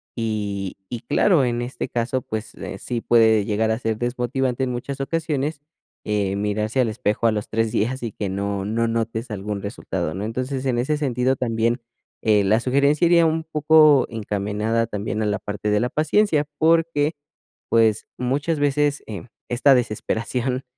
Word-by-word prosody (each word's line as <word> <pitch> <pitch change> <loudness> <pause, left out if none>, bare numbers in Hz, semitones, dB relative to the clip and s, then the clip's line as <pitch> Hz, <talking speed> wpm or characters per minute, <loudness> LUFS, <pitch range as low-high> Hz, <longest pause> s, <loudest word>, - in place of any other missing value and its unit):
y 105 -4 -3
y 120 -2 -5
claro, 175 -9 +3
en 120 0 -1
este 120 +2 -4
caso, 120 +2 -1
pues, 110 0 -6
eh, - - -7
sí 120 -2 -3
puede 110 -3 +4
llegar 110 +1 0
a 110 - -1
ser 110 -3 -1
desmotivante 125 +1 -1
en 125 - -3
muchas 135 +3 -4
ocasiones, 150 -1 -2 0.5
eh, 100 -2 0
mirarse 105 +4 -1
al 120 - +2
espejo 110 +1 0
a - - +4
los 105 0 -4
3 115 0 0
días 130 +5 -1
y 115 - -3
que 100 - -3
no 100 +1 -2
no 115 +2 0
notes 115 +1 -2
algún 100 0 -4
resultado, 95 -5 -4
¿no? 95 +4 -4
Entonces, 130 +4 -3
en 125 -2 +1
ese 145 +5 0
sentido, 130 -2 +1
también, 115 0 0 0.4
eh, 105 -3 +3
la 110 +4 +3
sugerencia 140 +5 +3
iría 170 -1 +5
un 160 0 +1
poco 155 -2 +5
encaminada 105 +1 -1
también 105 0 -3
a - - 0
la 105 0 0
parte 105 +1 -4
de 105 0 +3
la 125 - 0
paciencia, 155 +1 +2
porque, 165 -1 +2 0.5
pues, 110 -2 +3
muchas 140 +5 -1
veces, 145 0 +1
eh, 100 -5 -6 0.3
esta 135 +3 +5
desesperación, 125 +2 -1
120 Hz, 170 wpm, -22 LUFS, 105-135 Hz, 0.5 s, iría